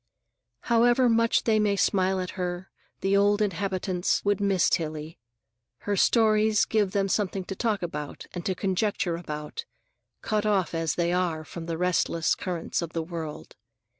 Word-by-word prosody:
However 240 +2 +3
much 230 0 +3
they 220 -2 +3
may 205 -1 +2
smile 190 -1 +2
at 185 0 -3
her, 180 -1 -4 0.3
the 195 +1 +2
old 205 +1 +3
inhabitants 190 -2 -1
would 205 -1 +1
miss 195 -3 +3
Tillie. 155 -2 -2 0.6
Her 205 - -1
stories 215 0 +3
give 210 -3 +1
them 195 -1 +1
something 195 -1 -1
to 195 - -6
talk 210 -3 -1
about 150 -4 -5
and 175 - -5
to 190 - 0
conjecture 190 -2 0
about, 150 -3 -6 0.6
cut 215 -1 0
off 200 -5 +1
as 165 -1 -1
they 170 0 0
are 170 -3 -1
from 170 0 -8
the 165 -1 -2
restless 170 -2 +1
currents 180 -2 -3
of 170 -1 -5
the 165 - -1
world. 160 -2 -7
185 Hz, 160 wpm, -26 LUFS, 170-205 Hz, 0.6 s, However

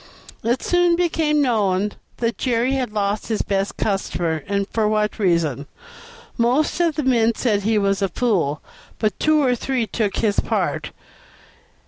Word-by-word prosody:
It 240 +3 0
soon 355 -1 +3
became 320 -4 +1
known 210 -5 +1 0.3
that 230 -1 -2
Jerry 245 0 +1
had 260 -4 -1
lost 205 0 -1
his 220 -2 -1
best 195 0 -2
customer, 175 -5 -1
and 200 -1 -1
for 220 -2 0
what 210 0 0
reason. 165 - +1 0.7
Most 250 +9 +2
of 335 -3 +2
the 300 - -1
men 230 -3 +2
said 210 -5 +1
he 220 +2 +1
was 200 -1 +1
a 195 - +1
fool, 175 - 0 0.3
but 215 -4 -1
two 310 -1 +3
or 255 -2 +3
three 250 0 -1
took 210 -1 -2
his 205 -2 +1
part. - - -1
220 Hz, 155 wpm, -21 LUFS, 200-255 Hz, 0.7 s, soon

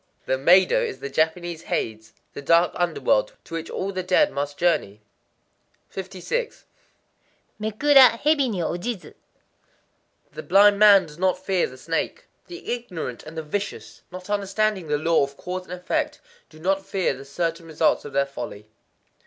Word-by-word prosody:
The - - 0
Meidō 175 +8 +5
is 450 -4 -4
the 140 - -6
Japanese 160 +2 -1
Hades,—the 110 -2 -5
dark 165 +4 +4
under 175 -1 -1
world - - +2
to - - -13
which 165 0 -4
all 195 +1 -3
the 185 -1 -3
dead 180 0 +3
must 145 +1 -4
journey. 135 - 0 0.9
56.—Mekura 230 - 0
hebi 290 -3 +2
ni 195 -6 -2
ojizu. 180 +5 -4 1.2
The - - -7
blind 200 +1 +5
man 200 -3 +7
does 150 +1 -14
not 185 0 +2
fear 185 -1 0
the 130 - -13
snake. 165 +5 -3 0.2
The 350 -8 -5
ignorant 180 - -6
and 160 +1 -11
the 160 - -3
vicious, 200 +7 -5
not 180 0 -9
understanding 205 -2 -1
the 150 0 +1
law 160 0 +2
of 140 0 -5
cause 180 0 -5
and 180 - -8
effect, 180 0 -2 0.3
do 155 - -17
not 195 +3 0
fear 190 -6 -1
the 135 +1 -10
certain 165 +4 -3
results 160 0 +1
of 145 - -8
their 140 - +2
folly. 120 -6 -8
180 Hz, 155 wpm, -24 LUFS, 155-205 Hz, 1.2 s, man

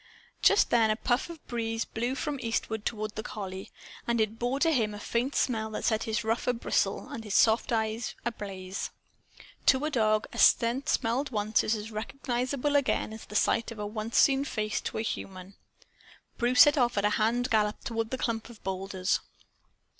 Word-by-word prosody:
Just 405 - +5
then 225 -2 +4
a 215 - +2
puff 245 +7 0
of 330 -3 -10
breeze 225 -1 -2
blew 240 +4 -2
from 295 -1 -3
eastward 225 -2 -2
toward 215 -2 -3
the 215 - -4
collie; 190 -3 -6 0.4
and 235 -1 +1
it 220 +1 0
bore 245 +3 -1
to 330 +2 +3
him 220 -7 +1
a - - -7
faint 240 +6 -1
scent 220 -3 0
that - - -3
set 220 -1 +1
his 220 +1 -1
ruff 225 +3 -1
a 250 - +3
bristle 235 - 0
and 225 - -6
his 210 -2 -3
soft 220 +1 +4
brown 230 -2 +2
eyes 220 +2 -4
ablaze. 195 -4 -4 0.8
To 265 +2 +5
a 310 - -1
dog, 215 -4 +2
a - - -5
scent 240 +4 +4
once - - +1
smelled 225 -3 +1
is 225 - +1
as 215 +1 -6
recognizable 255 +5 -2
again 275 -5 +1
as 220 - -8
is - - -12
the 210 - -10
sight 230 +2 +2
of 230 - -8
a 210 - -4
once 215 +2 -3
seen 275 0 +5
face 215 -6 -2
to - - -4
a 220 - -1
human. 190 -3 -5 0.8
Bruce 245 +1 +4
set 290 -3 +7
off 245 -2 +2
at 200 - +2
a - - +4
hand 240 +3 +1
gallop 210 -1 +1
toward 225 -1 -2
the 260 - -3
clump 230 -2 -2
of 230 -3 -14
boulders. 190 0 -1
225 Hz, 200 wpm, -29 LUFS, 215-245 Hz, 0.8 s, set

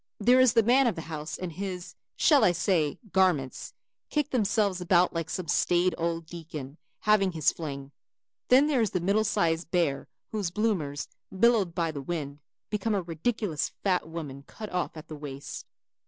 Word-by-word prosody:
There 245 +5 +5
is 255 -3 +5
the 230 - +5
man 250 +4 +4
of 230 - 0
the 165 - -6
house 155 +1 -5
and 180 -2 -5
his, 185 0 -5 0.2
shall 295 -4 +5
I 175 - +5
say 165 -4 +1
garments, 175 -9 +1 0.3
kick 295 -1 -1
themselves 205 -5 +1
about 180 0 +3
like 165 -1 -3
some 180 -2 -4
staid 175 +3 +2
old 165 0 -2
deacon 155 -4 -8 0.2
having 200 -3 +3
his 155 -3 +2
fling. 140 -4 -6 0.6
Then 260 +3 +6
there 290 -5 +2
is 220 - +2
the 180 - -1
middle 200 +5 +2
sized 170 -6 0
bear 165 -7 0 0.2
whose 205 -5 -1
bloomers, 175 -8 -1 0.2
billowed 200 -4 +2
by 165 -2 0
the 145 -2 -6
wind, 145 -1 -4 0.3
become 210 +1 0
a 195 - -1
ridiculous 170 +1 -2
fat 180 -5 +1
woman 150 -5 -6
cut 215 -1 -8
off 180 -2 -2
at 155 - -10
the 155 - -7
waist. 145 -2 -7
175 Hz, 175 wpm, -28 LUFS, 160-210 Hz, 0.6 s, Then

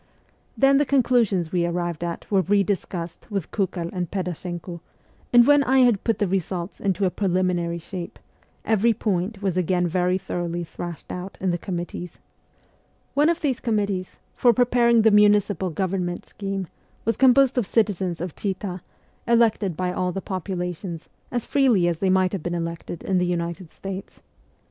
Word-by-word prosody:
Then 275 0 +5
the 290 - +4
conclusions 230 - +2
we 175 -2 +1
arrived 175 -1 -2
at 170 -1 -4
were 195 -2 +4
re 200 +2 +3
discussed 175 -3 -4
with 195 -6 -3
Kukel 185 -4 -2
and 180 -3 -3
Pedashenko; 175 -2 -5 0.5
and 240 -1 +7
when 290 +1 +6
I 265 0 +4
had 240 -6 +3
put 225 - +1
the 205 - +1
results 185 -1 -3
into 195 -1 0
a 185 - +1
preliminary 180 -3 0
shape, 170 +1 -7 0.5
every 225 +1 +3
point 200 -1 -2
was 185 -3 0
again 180 0 +1
very 180 +1 +1
thoroughly 175 -2 -3
thrashed 170 0 -7
out 180 +2 -6
in 185 -1 0
the 175 - 0
committees. 175 -1 -5 1.0
One 290 +2 +4
200 - - +5
of - - -24
these 270 -5 0
committees, 200 -5 -1 0.2
for 240 -1 +4
preparing 235 -1 +4
the 220 - +6
municipal 205 -3 +4
government 180 0 -2
scheme, 195 -1 -4 0.4
was 230 - +1
composed 265 0 +5
of 215 - -1
citizens 190 -6 0
of 175 -1 -5
Chita, 190 -2 -4 0.5
elected 225 -7 +2
by 180 -1 -1
all 180 0 -1
the 195 - -3
population, 180 -2 -4 0.3
as 240 -2 -2
freely 245 -11 +3
as 170 -2 -1
they 190 - +1
might 185 -1 +3
have 195 - -2
been 175 +2 -3
elected 170 0 -5
in 190 -2 +1
the 180 - +1
United 170 0 -3
States. 195 0 -7
190 Hz, 170 wpm, -24 LUFS, 175-210 Hz, 1.0 s, and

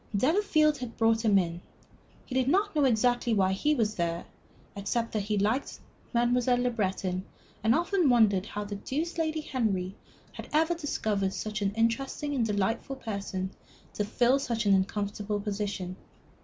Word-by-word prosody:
Delafield 310 - +3
had 245 -2 -7
brought 225 0 +3
him 210 -3 +5
in; 175 -2 -1 0.6
he - - -8
did 260 -1 +2
not 400 +5 +2
exactly 245 -3 +2
know - - +2
why 190 -1 +3
he 295 +10 +1
was 220 -5 +1
there, 170 -2 -2 0.5
except 215 +4 -2
that 215 - -1
he 210 +1 -1
liked 215 +7 0 0.3
Mademoiselle 245 +1 +2
Le 245 0 +1
Breton, 190 -4 -1 0.4
and 225 +1 +4
often 345 -1 +2
wondered 210 -5 +4
how 210 - -4
the 205 0 -5
deuce 320 - -3
Lady 315 -1 0
Henry 205 -10 -1 0.4
had - - -9
ever 320 +3 +3
discovered 215 - -1
such 215 0 -4
an 200 -1 +1
interesting 270 +6 0
and 255 -4 +1
delightful 210 +6 -1
person 200 -6 -4 0.4
to 210 - -1
fill 240 +5 +2
such 235 -4 -2
an 200 - +5
uncomfortable 205 +2 -1
position. 200 -3 -3
225 Hz, 160 wpm, -29 LUFS, 200-265 Hz, 0.6 s, him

